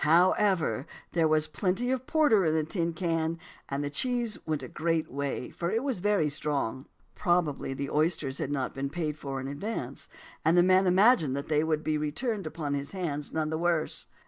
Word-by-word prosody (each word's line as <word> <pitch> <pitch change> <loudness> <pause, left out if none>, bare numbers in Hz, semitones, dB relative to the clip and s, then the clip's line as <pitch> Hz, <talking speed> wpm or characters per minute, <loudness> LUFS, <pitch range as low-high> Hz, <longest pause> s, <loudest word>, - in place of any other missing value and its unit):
However, 175 -1 +3 0.2
there 165 -2 +3
was 155 0 +2
plenty 190 +9 -1
of 260 0 -2
porter 295 -11 +4
in 160 -2 +2
a 160 - +2
tin 170 +1 -1
can; 165 -1 -1 0.3
and 140 +1 -2
the 145 - -3
cheese 240 - +1
went 155 -3 -1
a - - -5
great 165 +3 -1
way, 140 -2 -3
for 170 - -3
it 225 +6 0
was 265 -8 -1
very 200 -4 +2
strong." 140 -4 -2 0.3
Probably 150 -1 0
the 140 +1 -4
oysters 150 -3 0
had - - -2
not 135 -3 -1
been 135 0 -3
paid 155 -1 -2
for 135 -3 -5
in 135 - -5
advance, 140 - -4 0.3
and 160 +3 +4
the 175 - +7
man 185 +1 +4
imagined 185 - +5
that 140 +2 -5
they 150 0 +3
would 155 -1 0
be 155 -1 0
returned 195 - -2
upon 150 -3 -3
his 140 +3 -3
hands 150 -6 -3
none 155 -1 -1
the 160 - -1
worse. 170 -2 0
160 Hz, 200 wpm, -29 LUFS, 145-185 Hz, 0.3 s, the